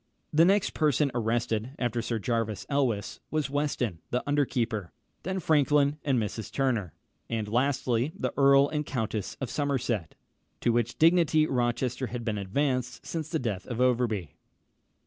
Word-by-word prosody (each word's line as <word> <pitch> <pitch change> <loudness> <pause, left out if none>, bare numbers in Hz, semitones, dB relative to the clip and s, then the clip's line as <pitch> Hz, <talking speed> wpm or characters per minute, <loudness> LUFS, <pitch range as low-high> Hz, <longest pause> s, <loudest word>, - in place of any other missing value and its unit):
The 160 +2 +6
next 195 +2 +3
person 150 -2 +2
arrested 115 +1 -1
after 120 -1 -1
Sir 115 0 -2
Jervis 110 -2 -2
Elwes, 130 -8 0
was 155 -3 -1
Weston, 140 - -1
the 125 - -1
under 145 0 +2
keeper; 115 -8 -2 0.3
then 190 +1 -2
Franklin 150 -2 +3
and 135 -4 +2
Mrs. 110 0 -4
Turner; 120 - 0 0.3
and 110 -2 -2
lastly, 125 +2 +1
the - - -2
Earl 140 0 +6
and 150 0 -2
Countess 110 -7 -3
of 130 -3 -4
Somerset, 130 - -1 0.5
to 120 - +3
which 120 0 0
dignity 160 -2 +4
Rochester 125 0 -1
had 120 -1 -5
been 105 -3 -1
advanced 125 +5 -1
since 160 -2 -4
the 160 - 0
death 110 -9 -3
of 120 -1 -4
Overbury. 120 - +1
125 Hz, 150 wpm, -28 LUFS, 115-145 Hz, 0.5 s, The